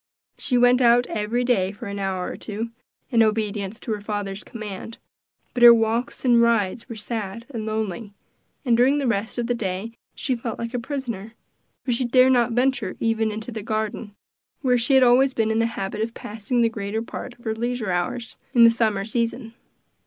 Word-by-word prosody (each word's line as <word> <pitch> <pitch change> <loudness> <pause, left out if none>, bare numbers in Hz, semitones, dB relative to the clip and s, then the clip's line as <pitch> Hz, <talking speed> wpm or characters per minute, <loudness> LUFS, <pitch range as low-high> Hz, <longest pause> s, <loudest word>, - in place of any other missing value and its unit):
She 250 - +1
went 245 +1 +5
out 240 0 +5
every 220 +3 -1
day 200 -7 +1
for 205 - -10
an 200 0 -5
hour 190 -2 -2
or - - -6
two, 220 +2 -5 0.4
in 230 -2 +4
obedience 215 -1 0
to 230 - -4
her 210 -1 -2
father's 205 -1 -4
command, 215 0 -8 0.6
but 245 - -3
her 240 -1 +10
walks 230 +3 -1
and 240 -2 +5
rides 230 -2 +1
were 230 - -6
sad 220 0 -5
and 220 -4 -5
lonely; 215 -1 -3 0.5
and 240 -2 +4
during 255 +5 +4
the 285 - -1
rest 225 -1 -1
of 240 - -1
the 245 - 0
day 200 -1 -3 0.2
she 260 - -1
felt 230 -1 -5
like 230 +1 -5
a 245 - -1
prisoner, 235 -5 -5 0.5
for 255 - 0
she 240 +2 0
dared 255 +2 +5
not 240 -2 +3
venture 265 +3 0
even 225 -1 +1
into 220 +3 -6
the 220 -1 -5
garden, 215 0 -3 0.5
where 255 -3 +3
she 245 +3 +2
had 265 - +7
always 255 +2 +4
been 220 -1 +1
in 220 - +1
the 230 - +2
habit 210 -2 -4
of 230 +1 -3
passing 220 +3 -2
the 230 - +4
greater 220 0 -3
part 245 +1 -8
of 240 - -21
her 220 - 0
leisure 235 -2 -2
hours, 230 +7 -2 0.2
in 235 - +7
the 230 - +8
summer 215 -4 0
season. 230 +1 -2
230 Hz, 200 wpm, -23 LUFS, 210-245 Hz, 0.6 s, her